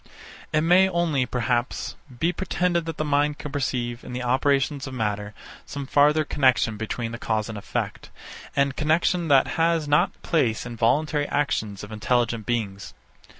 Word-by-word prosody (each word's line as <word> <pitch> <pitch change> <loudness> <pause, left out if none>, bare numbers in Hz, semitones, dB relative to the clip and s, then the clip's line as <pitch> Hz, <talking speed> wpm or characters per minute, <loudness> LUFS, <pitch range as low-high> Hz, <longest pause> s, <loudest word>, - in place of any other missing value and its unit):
It 155 - +2
may 180 +4 +5
only, 165 -7 +1
perhaps, 120 0 -1 0.2
be 170 +2 +1
pretended 175 -1 0
that 165 - -4
the 155 - -1
mind 145 0 +1
can 150 - -7
perceive, 125 -4 -2
in - - -8
the 125 0 -3
operations 135 +2 +1
of 130 - -6
matter, 105 -2 -2 0.3
some 140 -1 -5
farther 150 +3 +4
connexion 130 -6 +2
between 115 +2 -4
the 120 - -6
cause 110 -1 -1
and 110 - -6
effect; 100 - -4 0.5
and 140 -1 +2
connexion 165 +3 +1
that 140 -3 +5 0.2
has 165 -2 +2
not 175 +6 +2
place 120 -10 +1
in 120 -1 -6
voluntary 145 +6 +1
actions 110 -8 -1
of 105 - -9
intelligent 115 0 0
beings. 100 -5 -3
135 Hz, 160 wpm, -24 LUFS, 120-155 Hz, 0.5 s, may